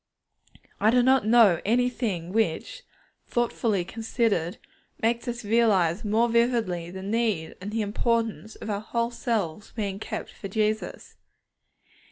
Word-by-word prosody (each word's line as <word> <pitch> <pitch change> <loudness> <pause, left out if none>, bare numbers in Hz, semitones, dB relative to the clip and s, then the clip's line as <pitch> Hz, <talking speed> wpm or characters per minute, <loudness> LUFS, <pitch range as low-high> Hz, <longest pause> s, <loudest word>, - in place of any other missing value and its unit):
I 215 - +4
do 245 +1 +4
not 260 -3 +4
know 220 -7 +6
anything 225 -6 0
which, 220 - -1 0.5
thoughtfully 230 -5 0
considered, 220 -5 -1 0.4
makes 235 +3 0
us 240 -1 -4
realize 205 -6 +3
more 220 +3 +2
vividly 230 -8 +1
the 190 +1 -7
need 210 -6 -1
and 200 - -5
the 220 +1 -1
importance 225 +1 -1
of 215 - -6
our 200 0 -2
whole 235 +2 -1
selves 210 -6 -2
being 200 -3 -3
kept - - -5
for 195 - -8
Jesus. 215 +2 -2
220 Hz, 130 wpm, -26 LUFS, 195-235 Hz, 0.5 s, know